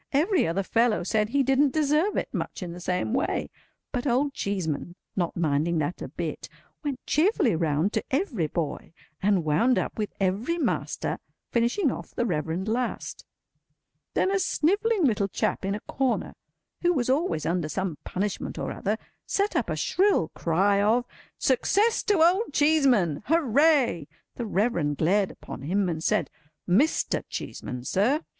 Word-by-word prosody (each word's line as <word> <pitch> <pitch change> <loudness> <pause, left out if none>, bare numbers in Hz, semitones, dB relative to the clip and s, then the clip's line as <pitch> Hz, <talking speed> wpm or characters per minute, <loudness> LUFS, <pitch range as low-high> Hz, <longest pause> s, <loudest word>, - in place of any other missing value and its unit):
Every 335 - +3
other 180 +4 0
fellow 230 0 +2
said 210 +3 +1
he 275 +3 +2
didn't 270 +1 +3
deserve 310 +6 +2
it, - - -1
much - - -4
in 175 - -5
the 175 - -8
same 180 +5 -1
way; 265 +5 -1 0.4
but 250 +1 -2
Old 275 +3 +1
Cheeseman, 175 - -3 0.2
not 175 -3 -1
minding 160 +1 +1
that 155 +3 -2
a - - -4
bit, - - -5 0.3
went 280 -4 -4
cheerfully 320 - +2
round 160 +4 +1
to - - 0
every 265 - 0
boy, 160 0 -4 0.3
and 195 -3 +2
wound 200 +12 +3
up - - -2
with 210 - -2
every 200 - 0
master—finishing 250 - -1
off - - -8
the 240 - 0
Reverend 170 0 -2
last. 240 +3 -3 0.9
Then 380 - +2
a 395 - +2
snivelling 400 +4 +1
little 210 -6 +2
chap - - -1
in 195 +1 -1
a - - -4
corner, 265 -2 -1 0.5
who 350 0 +3
was 255 -7 0
always 270 - 0
under 170 -2 0
some 185 -1 -3
punishment 200 +1 -3
or - - -3
other, 210 +3 -2 0.3
set 405 +1 0
up - - 0
a - - -1
shrill 385 - +2
cry 195 +4 +2
of 230 +4 +3 0.3
"Success 405 - +2
to 405 -7 +4
Old 370 +5 +3
Cheeseman! 270 - +3
Hooray!" 285 - +3 0.3
The 235 - -5
Reverend 175 - 0
glared 195 +4 +2
upon - - -9
him, 190 +7 0
and 160 -2 -3
said, - - +1 0.4
"Mr. 235 - +2
Cheeseman, 125 -1 -6
sir." 225 - +1
220 Hz, 155 wpm, -26 LUFS, 175-290 Hz, 0.9 s, to